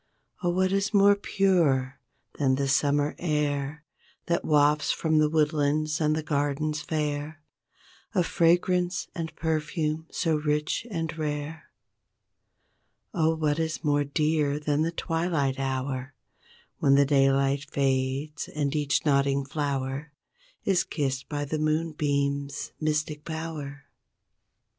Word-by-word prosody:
Oh 175 Hz, -, +1 dB
what 185 Hz, +1 st, +1 dB
is 195 Hz, +2 st, 0 dB
more 200 Hz, 0 st, +6 dB
pure 160 Hz, -10 st, +1 dB, 0.4 s
than 135 Hz, -2 st, +3 dB
the 140 Hz, +1 st, -1 dB
summer 145 Hz, +2 st, +2 dB
air 150 Hz, -2 st, -1 dB, 0.4 s
That 170 Hz, 0 st, 0 dB
wafts 150 Hz, 0 st, +3 dB
from 160 Hz, -1 st, +1 dB
the 155 Hz, 0 st, +3 dB
woodlands 150 Hz, 0 st, +1 dB
and 155 Hz, 0 st, +1 dB
gardens 150 Hz, +1 st, -1 dB
fair 150 Hz, 0 st, -3 dB, 0.8 s
A 180 Hz, -, +4 dB
fragrance 175 Hz, +1 st, +2 dB
and 165 Hz, -2 st, -5 dB
perfume 160 Hz, 0 st, -2 dB
so 160 Hz, -2 st, 0 dB
rich 150 Hz, +7 st, -1 dB
and 165 Hz, -5 st, -3 dB
rare? 150 Hz, 0 st, -4 dB, 1.4 s
Oh 160 Hz, 0 st, +2 dB
what 155 Hz, -1 st, 0 dB
is 160 Hz, -1 st, -2 dB
more 145 Hz, -1 st, +2 dB
dear 150 Hz, 0 st, 0 dB
than 150 Hz, 0 st, 0 dB
the 160 Hz, -, +1 dB
twilight 165 Hz, -6 st, -1 dB
hour 130 Hz, 0 st, -3 dB, 0.6 s
When 140 Hz, -1 st, +4 dB
the 140 Hz, 0 st, +5 dB
daylight 135 Hz, 0 st, +2 dB
fades 135 Hz, +2 st, -1 dB
and 145 Hz, -1 st, -2 dB
each 150 Hz, 0 st, +1 dB
nodding 140 Hz, -1 st, +2 dB
flower 140 Hz, +1 st, -3 dB, 0.5 s
Is 190 Hz, -3 st, +3 dB
kissed 135 Hz, -6 st, -3 dB
by 145 Hz, -1 st, -2 dB
the 155 Hz, +2 st, -3 dB
moonbeams' 145 Hz, -3 st, -1 dB
mystic 150 Hz, -1 st, -1 dB
power? 155 Hz, -3 st, -6 dB
150 Hz, 120 wpm, -27 LUFS, 140-160 Hz, 1.4 s, more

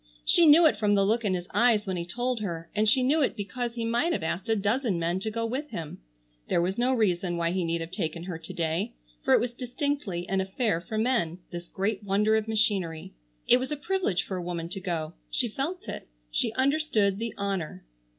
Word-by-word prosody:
She 340 Hz, -2 st, +6 dB
knew 320 Hz, +3 st, +8 dB
it 310 Hz, -, +4 dB
from 205 Hz, -1 st, +2 dB
the 195 Hz, -1 st, +4 dB
look 225 Hz, +3 st, +2 dB
in 195 Hz, -3 st, +1 dB
his 175 Hz, 0 st, -5 dB
eyes 230 Hz, -3 st, +4 dB
when 190 Hz, -2 st, -2 dB
he 170 Hz, -1 st, -4 dB
told 245 Hz, +5 st, -1 dB
her, 170 Hz, -5 st, -5 dB
and 215 Hz, +1 st, +3 dB
she 255 Hz, +3 st, +4 dB
knew 295 Hz, +5 st, +3 dB
it 270 Hz, -, +1 dB
because 235 Hz, +3 st, -4 dB
he 230 Hz, -1 st, -2 dB
might 240 Hz, +9 st, +1 dB
have 185 Hz, -, -2 dB
asked 185 Hz, +7 st, -3 dB
a 225 Hz, -, +4 dB
dozen 215 Hz, 0 st, +1 dB
men 170 Hz, +2 st, 0 dB
to 220 Hz, -, -2 dB
go 230 Hz, +1 st, -2 dB
with 265 Hz, +6 st, -3 dB
him. 165 Hz, -8 st, -6 dB, 0.5 s
There -, -, +3 dB
was 180 Hz, +3 st, 0 dB
no 255 Hz, +2 st, +3 dB
reason 180 Hz, -5 st, +1 dB
why 170 Hz, 0 st, +1 dB
he 185 Hz, 0 st, 0 dB
need 165 Hz, 0 st, -1 dB
have 165 Hz, +1 st, -6 dB
taken 165 Hz, -2 st, -3 dB
her 175 Hz, -3 st, -5 dB
to -, -, -8 dB
day, 160 Hz, -, -1 dB, 0.3 s
for -, -, +5 dB
it -, -, +5 dB
was 240 Hz, 0 st, -2 dB
distinctly 250 Hz, -, -3 dB
an 190 Hz, 0 st, +1 dB
affair 190 Hz, -2 st, 0 dB
for 215 Hz, +5 st, -5 dB
men, 220 Hz, -8 st, +1 dB
this 175 Hz, -1 st, -6 dB
great 200 Hz, +2 st, -2 dB
wonder 205 Hz, +2 st, +2 dB
of 220 Hz, 0 st, 0 dB
machinery. 200 Hz, -, 0 dB, 0.3 s
It 245 Hz, -, +7 dB
was 260 Hz, +3 st, -4 dB
a 300 Hz, -, -1 dB
privilege 320 Hz, -, 0 dB
for 190 Hz, -, -4 dB
a -, -, -3 dB
woman 170 Hz, -1 st, -4 dB
to 195 Hz, -, -5 dB
go. 170 Hz, -4 st, -3 dB, 0.2 s
She 245 Hz, -, 0 dB
felt 280 Hz, -, -4 dB
it. -, -, -6 dB, 0.2 s
She -, -, +1 dB
understood 260 Hz, -7 st, +2 dB
the 230 Hz, -1 st, -4 dB
honor. 190 Hz, -, -3 dB
205 Hz, 230 wpm, -28 LUFS, 175-245 Hz, 0.5 s, knew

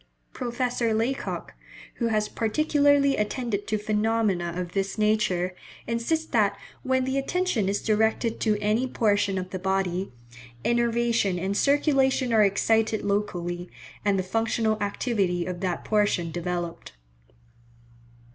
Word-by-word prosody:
Professor 240 Hz, -2 st, -1 dB
Laycock, 240 Hz, +5 st, -2 dB, 0.4 s
who 235 Hz, -, 0 dB
has 215 Hz, -2 st, +1 dB
particularly 285 Hz, +3 st, +2 dB
attended 210 Hz, -1 st, -2 dB
to 215 Hz, -, 0 dB
phenomena 210 Hz, -4 st, 0 dB
of 180 Hz, -1 st, -4 dB
this 195 Hz, +1 st, -2 dB
nature, 210 Hz, -4 st, +1 dB, 0.3 s
insists 235 Hz, +8 st, -1 dB
that 215 Hz, -7 st, +1 dB, 0.2 s
"when 260 Hz, 0 st, +1 dB
the 265 Hz, +1 st, 0 dB
attention 275 Hz, -, 0 dB
is 200 Hz, -, -1 dB
directed 220 Hz, +1 st, +1 dB
to 215 Hz, -2 st, +1 dB
any 220 Hz, +5 st, +1 dB
portion 205 Hz, -5 st, +1 dB
of 185 Hz, 0 st, -4 dB
the 185 Hz, -, -4 dB
body, 190 Hz, -2 st, -1 dB, 0.5 s
innervation 235 Hz, -4 st, +1 dB
and 190 Hz, +3 st, -2 dB
circulation 270 Hz, -2 st, +2 dB
are 220 Hz, -1 st, +6 dB
excited 220 Hz, +2 st, +2 dB
locally, 180 Hz, -4 st, -2 dB, 0.3 s
and 200 Hz, -1 st, +2 dB
the 185 Hz, -, 0 dB
functional 220 Hz, +2 st, 0 dB
activity 200 Hz, -4 st, 0 dB
of 180 Hz, -1 st, -4 dB
that 180 Hz, -2 st, -2 dB
portion 205 Hz, -6 st, +1 dB
developed." 175 Hz, 0 st, -4 dB
215 Hz, 125 wpm, -26 LUFS, 190-235 Hz, 0.5 s, are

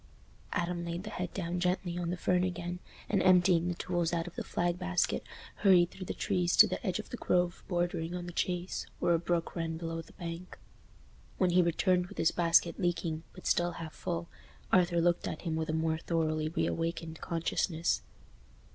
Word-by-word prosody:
Adam 175 Hz, 0 st, -1 dB
laid 170 Hz, +1 st, -4 dB
the 215 Hz, -, -6 dB
head 180 Hz, -3 st, -3 dB
down 180 Hz, -1 st, -3 dB
gently 180 Hz, 0 st, 0 dB
on 175 Hz, -1 st, -2 dB
the 180 Hz, -, -2 dB
fern 180 Hz, 0 st, +2 dB
again, 180 Hz, -1 st, -3 dB, 0.3 s
and 200 Hz, -3 st, +2 dB
emptying 180 Hz, -2 st, +5 dB
the 175 Hz, -, -1 dB
tools 175 Hz, -1 st, -1 dB
out 170 Hz, -1 st, 0 dB
of 175 Hz, -, -8 dB
the -, -, -3 dB
flag 175 Hz, 0 st, -1 dB
basket, 180 Hz, -1 st, +1 dB, 0.4 s
hurried 180 Hz, -4 st, +5 dB
through 185 Hz, -, -8 dB
the -, -, -2 dB
trees 180 Hz, -3 st, +1 dB
to -, -, +11 dB
the -, -, -4 dB
edge 185 Hz, -5 st, 0 dB
of 215 Hz, -, -7 dB
the 245 Hz, -, -4 dB
Grove 175 Hz, -4 st, +1 dB
bordering 175 Hz, -1 st, -1 dB
on 175 Hz, -1 st, -4 dB
the 175 Hz, -, -6 dB
Chase, 180 Hz, +1 st, -2 dB
where 170 Hz, -, +2 dB
a 165 Hz, -, +3 dB
brook 170 Hz, 0 st, -1 dB
ran 165 Hz, -1 st, -2 dB
below 165 Hz, 0 st, -4 dB
the -, -, -17 dB
bank. 170 Hz, +1 st, -7 dB, 0.8 s
When 185 Hz, -2 st, +3 dB
he 180 Hz, +1 st, +5 dB
returned 180 Hz, +1 st, +2 dB
with -, -, -12 dB
his 165 Hz, -, +3 dB
basket 170 Hz, 0 st, +3 dB
leaking, 165 Hz, -2 st, -1 dB
but -, -, -12 dB
still 175 Hz, 0 st, +2 dB
half 165 Hz, -2 st, -7 dB
full, 170 Hz, -1 st, -3 dB, 0.4 s
Arthur 175 Hz, -2 st, +4 dB
looked 175 Hz, 0 st, +2 dB
at 155 Hz, -, -5 dB
him 165 Hz, -3 st, -1 dB
with 160 Hz, 0 st, -2 dB
a -, -, +2 dB
more 160 Hz, 0 st, 0 dB
thoroughly 155 Hz, -2 st, 0 dB
reawakened 165 Hz, 0 st, -2 dB
consciousness. 165 Hz, 0 st, 0 dB
175 Hz, 195 wpm, -31 LUFS, 165-180 Hz, 0.8 s, to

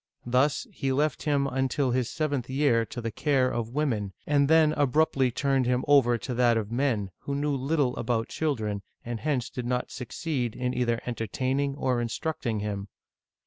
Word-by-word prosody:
Thus, 130 Hz, +4 st, +2 dB
he 135 Hz, -, -2 dB
left 145 Hz, +3 st, +1 dB
him 145 Hz, -2 st, +1 dB
un 135 Hz, 0 st, 0 dB
til 135 Hz, -1 st, 0 dB
his 125 Hz, -1 st, 0 dB
seventh 145 Hz, -5 st, -2 dB
year 130 Hz, -4 st, +2 dB
to 125 Hz, -4 st, -6 dB
the 115 Hz, 0 st, -3 dB
care 135 Hz, 0 st, +1 dB
of 120 Hz, +1 st, -3 dB
women, 115 Hz, -10 st, 0 dB
and 145 Hz, -1 st, +3 dB
then 160 Hz, 0 st, +5 dB
abruptly 145 Hz, -1 st, +2 dB
turned 135 Hz, 0 st, +1 dB
him 125 Hz, 0 st, +1 dB
over 130 Hz, -5 st, +5 dB
to 125 Hz, +2 st, -5 dB
that 120 Hz, -1 st, +3 dB
of 110 Hz, -1 st, -3 dB
men, 120 Hz, -6 st, 0 dB
who 140 Hz, -, -4 dB
knew 145 Hz, 0 st, 0 dB
little 135 Hz, -1 st, 0 dB
about 115 Hz, -2 st, 0 dB
chil 155 Hz, -3 st, 0 dB
dren, 105 Hz, -3 st, -3 dB, 0.2 s
and 120 Hz, -1 st, -4 dB
hence 140 Hz, -4 st, -1 dB
did 125 Hz, -2 st, -5 dB
not 125 Hz, 0 st, -1 dB
succeed 125 Hz, -2 st, -3 dB
in 125 Hz, 0 st, -1 dB
either 120 Hz, -2 st, 0 dB
entertaining 130 Hz, +4 st, -1 dB
or 130 Hz, -3 st, 0 dB
instructing 120 Hz, -2 st, -2 dB
him. 100 Hz, -1 st, -3 dB
130 Hz, 185 wpm, -27 LUFS, 120-140 Hz, 0.2 s, then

